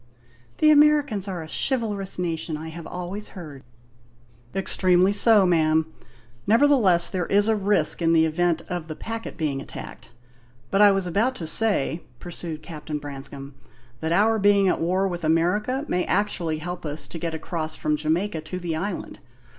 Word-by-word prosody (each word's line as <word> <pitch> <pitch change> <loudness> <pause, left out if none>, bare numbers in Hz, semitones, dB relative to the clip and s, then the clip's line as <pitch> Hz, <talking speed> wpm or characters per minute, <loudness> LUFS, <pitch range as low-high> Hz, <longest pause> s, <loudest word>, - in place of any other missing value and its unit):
"The 305 - +5
Americans 295 -9 +3
are 180 -4 -4
a - - -10
chivalrous 210 - -2
nation, 165 -3 -3
I 160 +1 -7
have 165 0 -9
always 180 +4 -5
heard." 150 -6 -9 0.9
"Extremely 185 0 +2
so, 205 -1 +5
ma'am; 160 -2 +2 0.5
nevertheless, 225 -7 +5
there 180 -3 -2
is 205 +1 +3
a 220 - +3
risk, 200 -6 +1
in 165 0 +3
the 160 -1 +4
event 165 +1 0
of 175 -3 -4
the 155 - -6
packet 225 +4 -6
being 145 -4 -2
attacked. - - -10 0.6
But 195 - +3
I 205 - +8
was 195 -1 0
about 220 +9 0
to 170 - -5
say," 170 -3 +1 0.2
pursued 165 +1 -7
Captain 155 -2 -6
Branscome, 140 -1 -7 0.5
"that 160 - -3
our 215 +5 +3
being 200 -1 +4
at 180 - 0
war 185 +3 +1
with 175 -2 -5
America 195 - +1
may 180 - 0
actually 180 -5 0
help 175 +3 -6
us 150 -1 -2
to 165 - -8
get 165 0 -3
across 160 -1 -4
from 150 0 -1
Jamaica 160 +3 -1
to 160 +4 -6
the 175 -3 -3
island. 190 +4 -5
175 Hz, 165 wpm, -24 LUFS, 160-205 Hz, 0.9 s, I